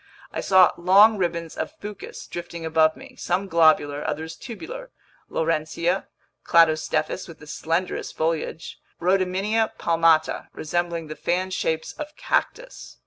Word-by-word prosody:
I -, -, -2 dB
saw 185 Hz, -2 st, +6 dB
long 200 Hz, +5 st, +6 dB
ribbons 170 Hz, -2 st, -2 dB
of -, -, -4 dB
fucus 205 Hz, -1 st, -9 dB
drifting 170 Hz, -1 st, -7 dB
above 160 Hz, 0 st, +3 dB
me, 265 Hz, -1 st, -13 dB
some 185 Hz, +3 st, -1 dB
globular, 155 Hz, -4 st, +3 dB
others 160 Hz, +1 st, -4 dB
tubular: 485 Hz, -, -8 dB, 0.4 s
Laurencia, 165 Hz, +3 st, -1 dB, 0.4 s
Cladostephus 165 Hz, +2 st, +2 dB
with 165 Hz, -, -11 dB
the 150 Hz, -, -14 dB
slenderest 165 Hz, +4 st, -3 dB
foliage, 160 Hz, 0 st, -2 dB, 0.2 s
Rhodymenia 195 Hz, +5 st, +1 dB
palmata 165 Hz, -1 st, +2 dB
resembling 170 Hz, +1 st, -2 dB
the 155 Hz, 0 st, -7 dB
fan 185 Hz, +3 st, -1 dB
shapes 160 Hz, -3 st, -1 dB
of 300 Hz, 0 st, -8 dB
cactus. -, -, -2 dB
170 Hz, 125 wpm, -24 LUFS, 160-190 Hz, 0.4 s, saw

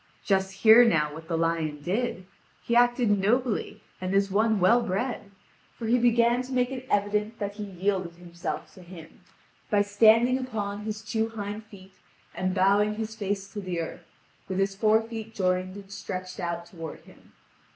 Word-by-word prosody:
Just 190 Hz, -1 st, +1 dB
hear 225 Hz, +2 st, +10 dB
now 150 Hz, -10 st, +2 dB
what 160 Hz, +1 st, -10 dB
the 165 Hz, -, -1 dB
lion 165 Hz, -2 st, -1 dB
did! 185 Hz, +3 st, -2 dB, 0.4 s
He 235 Hz, -, 0 dB
acted 240 Hz, -4 st, +3 dB
nobly 235 Hz, +3 st, 0 dB, 0.2 s
and 185 Hz, +1 st, -2 dB
as 200 Hz, 0 st, +2 dB
one 220 Hz, +1 st, +2 dB
well 225 Hz, +7 st, +5 dB
bred; 230 Hz, +1 st, -3 dB, 0.5 s
for 230 Hz, -, -6 dB
he 240 Hz, +3 st, +3 dB
began 235 Hz, +1 st, +3 dB
to 255 Hz, +1 st, -9 dB
make 250 Hz, 0 st, +1 dB
it 260 Hz, -1 st, -6 dB
evident 210 Hz, +2 st, 0 dB
that 205 Hz, -1 st, -4 dB
he 210 Hz, -, -4 dB
yielded 185 Hz, -2 st, -2 dB
himself 175 Hz, 0 st, -6 dB
to 185 Hz, -, -14 dB
him, 170 Hz, -2 st, -13 dB, 0.5 s
by 205 Hz, -2 st, +3 dB
standing 225 Hz, +5 st, +4 dB
upon 210 Hz, -5 st, -4 dB
his 215 Hz, 0 st, -5 dB
two 220 Hz, +1 st, -1 dB
hind 210 Hz, -1 st, -6 dB
feet 195 Hz, -3 st, -15 dB, 0.4 s
and 185 Hz, 0 st, -2 dB
bowing 205 Hz, +2 st, +3 dB
his 220 Hz, 0 st, -4 dB
face 200 Hz, -2 st, -3 dB
to 210 Hz, -, -4 dB
the 180 Hz, -3 st, -3 dB
earth, 165 Hz, -, -6 dB, 0.4 s
with 190 Hz, -, -2 dB
his 195 Hz, 0 st, +1 dB
fore 220 Hz, +2 st, +3 dB
feet 225 Hz, -1 st, -8 dB
joined 185 Hz, 0 st, 0 dB
and 200 Hz, -1 st, -11 dB
stretched 185 Hz, -2 st, -6 dB
out 170 Hz, -1 st, -3 dB
toward 165 Hz, -3 st, -9 dB
him. -, -, -20 dB
205 Hz, 175 wpm, -27 LUFS, 185-225 Hz, 0.5 s, hear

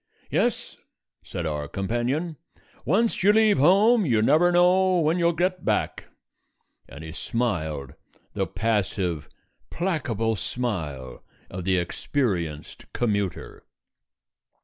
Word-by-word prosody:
"Yes," -, -, -1 dB, 0.4 s
said 85 Hz, -, -6 dB
our 75 Hz, -2 st, -3 dB
companion, 120 Hz, -, -2 dB, 0.5 s
"once 220 Hz, +7 st, +1 dB
you 200 Hz, +2 st, +6 dB
leave 215 Hz, -5 st, +4 dB
home 205 Hz, -, +5 dB
you 115 Hz, -, +2 dB
never 165 Hz, +8 st, +4 dB
know 180 Hz, +1 st, +4 dB
when 165 Hz, +2 st, +1 dB
you'll 170 Hz, 0 st, +3 dB
get 180 Hz, +2 st, -1 dB
back." -, -, -1 dB, 0.8 s
And 70 Hz, +6 st, -10 dB
he 80 Hz, -, -7 dB
smiled 80 Hz, -, -3 dB, 0.4 s
the -, -, -1 dB
passive, 95 Hz, -6 st, -1 dB, 0.4 s
placable 120 Hz, -, -1 dB
smile 80 Hz, -, -4 dB, 0.3 s
of 90 Hz, -1 st, -6 dB
the 95 Hz, -1 st, +2 dB
experienced 85 Hz, -, -3 dB
commuter. 100 Hz, -5 st, -2 dB
115 Hz, 105 wpm, -25 LUFS, -, 0.8 s, you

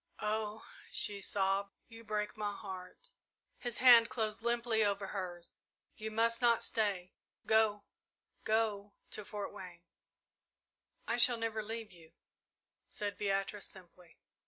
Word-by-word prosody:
"Oh," 215 Hz, 0 st, -2 dB, 0.3 s
she 200 Hz, -1 st, +2 dB
sobbed, 195 Hz, 0 st, 0 dB
"you 230 Hz, -1 st, -12 dB
break 210 Hz, -1 st, -2 dB
my 210 Hz, -1 st, -2 dB
heart!" 195 Hz, -, -9 dB, 0.5 s
His 240 Hz, -1 st, -2 dB
hand 235 Hz, -2 st, +8 dB
closed 220 Hz, -2 st, -2 dB
limply 235 Hz, -1 st, +1 dB
over 200 Hz, -1 st, 0 dB
hers. 180 Hz, -3 st, -6 dB, 0.4 s
"You 220 Hz, 0 st, -5 dB
must 230 Hz, +2 st, +1 dB
not 235 Hz, -1 st, +4 dB
stay 195 Hz, -5 st, 0 dB, 0.3 s
go 220 Hz, -2 st, +3 dB, 0.6 s
go 210 Hz, -2 st, 0 dB, 0.2 s
to 210 Hz, -, -4 dB
Fort 205 Hz, 0 st, -6 dB
Wayne!" 175 Hz, -2 st, -10 dB, 1.2 s
"I 230 Hz, -, 0 dB
shall 240 Hz, 0 st, +7 dB
never 225 Hz, -1 st, -2 dB
leave 220 Hz, 0 st, -5 dB
you," 165 Hz, -3 st, -13 dB, 0.8 s
said 205 Hz, -1 st, -3 dB
Beatrice, 195 Hz, +1 st, -1 dB
simply. 180 Hz, -2 st, -15 dB
210 Hz, 125 wpm, -34 LUFS, 195-225 Hz, 1.2 s, hand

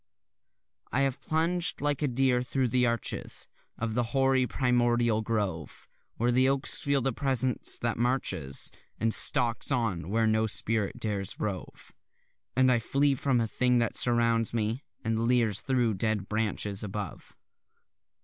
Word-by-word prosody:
I 135 Hz, -, +1 dB
have 135 Hz, -2 st, -1 dB
plunged 170 Hz, +2 st, 0 dB
like 145 Hz, 0 st, -1 dB
a 150 Hz, -, +1 dB
deer 125 Hz, -1 st, +1 dB
thro' 130 Hz, +1 st, -1 dB
the 125 Hz, +1 st, +2 dB
arches 115 Hz, -2 st, -2 dB, 0.3 s
Of 115 Hz, -1 st, -3 dB
the 120 Hz, -, +1 dB, 0.2 s
hoary 135 Hz, -1 st, +3 dB
primordial 120 Hz, -3 st, +1 dB
grove, 100 Hz, -9 st, -4 dB, 0.3 s
Where 120 Hz, +2 st, +1 dB
the 130 Hz, +2 st, +3 dB
oaks 135 Hz, +1 st, +1 dB
feel 140 Hz, -1 st, +1 dB
the 135 Hz, -1 st, 0 dB
presence 130 Hz, -2 st, 0 dB
that 115 Hz, -1 st, -2 dB
marches 95 Hz, -, -1 dB, 0.3 s
And 115 Hz, 0 st, +1 dB
stalks 120 Hz, +3 st, +3 dB
on 105 Hz, -10 st, -1 dB
where 115 Hz, +2 st, +1 dB
no 110 Hz, 0 st, +2 dB
spirit 110 Hz, -1 st, 0 dB
dares 100 Hz, -3 st, -3 dB
rove, 100 Hz, -5 st, -6 dB, 0.6 s
And 130 Hz, 0 st, +4 dB
I 120 Hz, -, +3 dB
flee 140 Hz, +5 st, +1 dB
from 135 Hz, -2 st, 0 dB
a 115 Hz, -, +1 dB
thing 125 Hz, +2 st, +1 dB
that 115 Hz, -2 st, 0 dB
surrounds 115 Hz, -1 st, +2 dB
me, 115 Hz, +4 st, -1 dB, 0.2 s
and 115 Hz, +1 st, 0 dB
leers 120 Hz, -5 st, +2 dB
thro' 125 Hz, -4 st, +1 dB
dead 105 Hz, 0 st, -2 dB
branches 105 Hz, -2 st, -1 dB
above. 100 Hz, -2 st, -7 dB
120 Hz, 150 wpm, -28 LUFS, 110-130 Hz, 0.6 s, And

